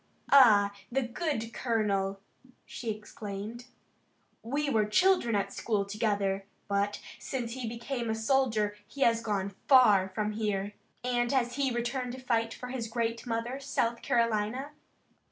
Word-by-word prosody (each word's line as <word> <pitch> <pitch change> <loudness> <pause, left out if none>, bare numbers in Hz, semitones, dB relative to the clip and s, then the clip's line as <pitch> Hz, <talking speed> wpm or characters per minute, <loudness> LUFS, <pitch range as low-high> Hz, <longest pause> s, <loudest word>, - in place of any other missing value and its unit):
"Ah, 210 -7 +7 0.2
the 270 +2 +1
good 240 -2 -3
colonel!" 200 -5 0 0.5
she 235 - -6
exclaimed. 210 +2 -6 0.8
"We 285 +6 -1
were 220 -6 +2
children 240 - +3
at 200 - -1
school 210 -3 -1
together, 200 -2 -1 0.2
but 200 +1 0 0.2
since 240 -4 -4
he 245 -2 -4
became 235 +1 -4
a 220 - 0
soldier 220 -3 +1
he 275 - -10
has 230 -3 +4
gone 200 -3 -2
far 210 -8 +6
from 210 +2 -2
here. 210 -2 -2 0.3
And 240 -1 +1
has 245 -3 +1
he 275 -1 +1
returned 245 +1 -2
to 260 - -7
fight 230 -3 0
for 250 +2 -7
his 250 -3 -3
great 230 +1 -2
mother, 235 +3 -2
South 235 -4 -1
Carolina?" 230 +4 0
230 Hz, 140 wpm, -30 LUFS, 210-250 Hz, 0.8 s, Ah